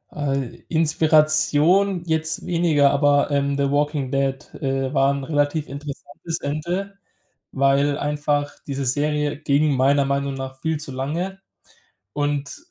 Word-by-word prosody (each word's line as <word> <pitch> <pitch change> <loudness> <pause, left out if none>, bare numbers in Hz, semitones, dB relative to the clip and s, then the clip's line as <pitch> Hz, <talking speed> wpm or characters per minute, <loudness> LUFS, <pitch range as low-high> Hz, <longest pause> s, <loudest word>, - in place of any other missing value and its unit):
Äh, 135 -4 -3
Inspiration 160 +3 +3
jetzt 160 -1 -1
weniger, 165 -5 +3
aber, 145 0 +3
ähm, 140 0 0
„The 140 -1 +1
Walking 145 -2 0
Dead“, 135 -1 -1
äh, 135 -1 -2
war 135 0 +3
'n 140 -1 -4
relativ 145 +1 0
interessantes 145 +3 -6
Ende, 175 +7 -3 0.5
weil 140 +1 +2
einfach 145 0 -1 0.2
diese 140 -1 -3
Serie 150 +2 0
ging 150 0 +2
meiner 140 +2 +3
Meinung 140 0 -1
nach 130 0 -7
viel 160 -1 -1
zu 145 -2 -7
lange 165 +9 -3 0.7
und 145 -1 -2
145 Hz, 125 wpm, -22 LUFS, 140-155 Hz, 0.7 s, Inspiration